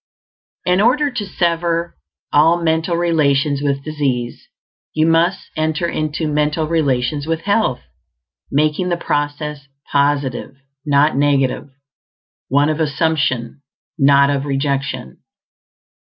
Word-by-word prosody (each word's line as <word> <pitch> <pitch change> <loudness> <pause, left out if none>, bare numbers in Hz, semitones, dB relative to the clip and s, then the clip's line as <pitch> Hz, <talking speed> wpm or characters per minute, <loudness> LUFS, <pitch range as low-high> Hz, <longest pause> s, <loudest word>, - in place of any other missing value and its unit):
In 180 +2 +3
order 280 +6 +3
to 225 -5 -4
sever 170 -1 -1 0.4
all 165 +4 +5
mental 160 +1 +1
relations 150 -4 +1
with 140 -1 -1
disease, 135 -6 -3 0.5
you 155 0 +3
must 165 +3 +1
enter 155 +2 -1
into 155 0 -2
mental 150 +1 0
relations 145 -2 0
with 165 0 -1
health, 200 - 0 0.7
making 155 +5 +1
the 175 - 0
process 145 -2 -3 0.2
positive 140 -2 0 0.3
not 145 +1 +3
negative; 140 -1 +1 0.8
one 145 +3 +2
of 155 +1 -1
assumption, 145 -5 -1 0.4
not 140 0 +5
of 140 0 -1
rejection. 140 - -2
150 Hz, 110 wpm, -18 LUFS, 140-165 Hz, 0.8 s, all